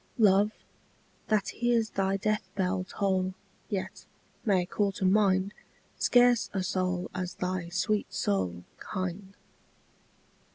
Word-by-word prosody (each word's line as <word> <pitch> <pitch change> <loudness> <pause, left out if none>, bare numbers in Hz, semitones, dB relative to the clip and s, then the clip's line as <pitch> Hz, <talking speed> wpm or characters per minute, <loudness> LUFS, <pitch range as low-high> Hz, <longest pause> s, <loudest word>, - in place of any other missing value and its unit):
Love, 205 -2 +5 0.8
that 215 -3 +1
hears 235 -2 +1
thy 195 0 +1
death 210 -1 -1
bell 185 -1 0
toll 190 -2 0 0.3
Yet, 195 -2 -4 0.4
may 190 -6 +2
call 200 +2 0
to 190 - -2
mind 195 0 +3 0.5
Scarce 245 -2 +4
a 190 -2 -1
soul 185 -1 -1
as 180 -1 -4
thy 180 -1 -2
sweet 205 +4 0
soul 90 -3 -1 0.2
Kind. 190 +1 -5
190 Hz, 115 wpm, -29 LUFS, 185-210 Hz, 0.8 s, Love